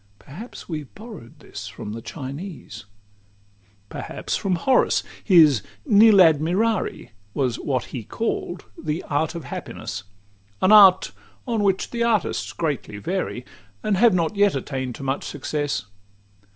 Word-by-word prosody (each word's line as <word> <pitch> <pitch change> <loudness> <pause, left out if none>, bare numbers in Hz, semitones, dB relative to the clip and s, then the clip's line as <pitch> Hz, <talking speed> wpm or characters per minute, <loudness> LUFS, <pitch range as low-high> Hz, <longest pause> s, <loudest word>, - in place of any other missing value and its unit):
Perhaps 190 - -11
we 160 -3 -3
have 145 - -13
borrow'd 210 - -12
this - - -8
from 105 - -7
the 115 - -6
Chinese 145 - -8
XXXV 100 0 -35
Perhaps - - -4
from 190 -2 0
Horace: 255 +10 +2 0.2
his 155 - +6 0.2
"Nil 220 -3 +6
admirari" 175 - +2 0.2
Was 125 -4 0
what 130 -3 -1
he 120 - -4
call'd 180 - -3
the 155 +1 -4
"Art 160 +3 -1
of 170 - -5
Happiness;" 100 -4 -6 0.5
An 185 - +3
art 195 -3 +7 0.4
on 230 -3 0
which 195 -1 0
the 235 - -3
artists 230 -4 0
greatly 145 -10 -3
vary, 145 - -3 0.4
And 210 -2 +1
have 225 -2 +5
not 170 +3 0
yet 200 -3 +3
attain'd 130 -2 -4
to - - -9
much 135 +1 -2
success. 145 -5 -3
155 Hz, 140 wpm, -23 LUFS, 125-195 Hz, 0.5 s, art